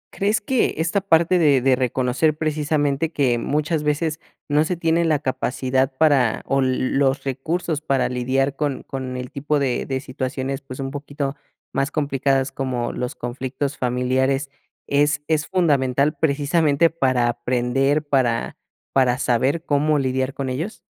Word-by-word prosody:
¿Crees 205 +2 +1
que 255 +3 +1
esta 165 +5 0
parte 175 -1 +3
de 145 -5 +4
de 130 0 +4
reconocer, 130 +4 0
precisamente, 150 0 0
que 130 -6 +1
muchas 150 +4 -1
veces 155 +2 -1 0.3
no 150 +1 +3
se 175 +2 -2
tiene 165 0 +1
la 155 -2 +3
capacidad 130 -1 -1
para 140 -8 +3
o 135 0 +1
los 130 +1 +1
recursos 155 +4 -2
para 135 -5 +1
lidiar 130 +2 0
con 145 -2 -2
con 130 -1 -5
el 125 0 -6
tipo 145 +2 -1
de 135 -3 -1
de 135 -1 -1
situaciones, 130 0 -4
pues, 130 -1 -10
un 135 0 -3
poquito 145 0 -4 0.4
más 135 +1 0
complicadas 135 -3 0
como 125 -3 -2
los 125 0 -4
conflictos 130 +3 -4
familiares, 130 +2 0 0.3
es 145 +1 +1
es 155 -1 0
fundamental 145 -6 +2
precisamente 150 +1 +2
para 130 -6 +1
aprender, 125 +5 0
para 125 -5 +1 0.4
para 125 -2 +3
saber 135 +6 0
cómo 150 +1 +2
lidiar 130 0 -1
con 135 -2 -3
ellos? 160 +12 -4
140 Hz, 145 wpm, -22 LUFS, 130-150 Hz, 0.4 s, de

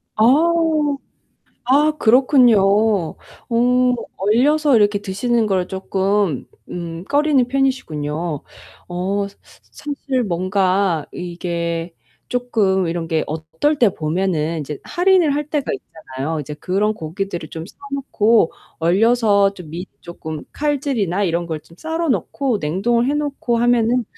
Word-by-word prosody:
아. 215 - +2 1.5
아 295 +3 +5
그렇군요. 245 -2 +5
어 230 +5 +1 0.2
얼려서 265 +7 +3
이렇게 205 -1 +3
드시는 220 +3 0
걸 185 -2 0
조금 190 -3 -1 0.2
음 170 0 -6
꺼리는 285 0 +2
편이시군요. 165 - -2 0.5
어 195 +3 -2
스 200 - -18 0.3
사실 280 -3 -3
뭔가 185 -2 +1
이게 170 -1 -4 0.4
조금 210 -7 +1
이런 165 0 -3
게 160 -1 +1
어떨 160 - -1
때 235 -4 +5
보면은 165 0 -1
이제 150 0 -6
할인을 355 -4 +3
할 295 +1 -3
때가 295 -4 -1
있잖아요. 150 +1 -5
이제 150 +1 -7
그런 200 +7 0
고기들을 170 -1 -5
좀 160 0 -7
사 - - -15 0.2
놓고 230 -8 +2 0.3
얼려서 200 +2 +3
좀 180 -6 -11
밑 175 +4 -6
조금 160 -2 -7
칼질이나 265 - 0
이런 170 -1 -1
걸 160 -2 -3
좀 165 - -19
썰어 325 0 -2
놓고 255 -2 0
냉동을 230 - +1
해 285 - +1
놓고 280 -5 -1
하면은 240 0 +2
200 Hz, 245 characters per minute, -20 LUFS, 170-250 Hz, 1.5 s, 아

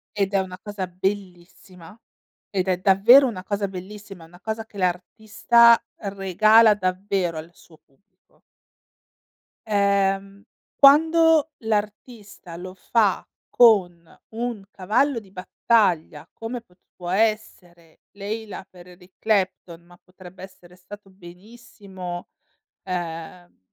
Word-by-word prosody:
Ed 200 -1 -1
è 195 - +3
una 185 -1 -5
cosa 205 -3 -6
bellissima, 180 -1 -7 0.5
ed 190 -2 -2
è 185 -1 +1
davvero 210 +9 +5
una 190 -7 -6
cosa 200 0 -3
bellissima, 195 -1 -11
una 175 +2 -18
cosa 220 +2 -5
che 220 - -16
l'artista, 220 +5 +3 0.2
regala 210 +3 +3
davvero 185 -3 -2
al 160 +2 -9
suo 160 -2 -21
pubblico. 185 +8 -37 1.3
Ehm, 200 -1 0 0.3
quando 320 +2 +5
l'artista 210 -3 -5
lo 185 +2 -9
fa 205 +1 0 0.2
con 180 -8 +2
un 230 -2 -5
cavallo 230 +8 0
di 200 -4 -19
battaglia, 180 -5 -1
come 230 +2 -6
è - - -22
potuto 180 -3 -13
essere 185 -5 -3
"Layla" 205 0 -7
per 180 -1 -16
Eric 180 +1 -18
Clapton, 190 -5 -2
ma 175 0 -20
potrebbe 185 0 -15
essere 180 -2 -15
stato 200 +2 -14
benissimo, 190 -1 -11 0.6
ehm 175 -1 -7
195 Hz, 110 wpm, -22 LUFS, 180-215 Hz, 1.3 s, davvero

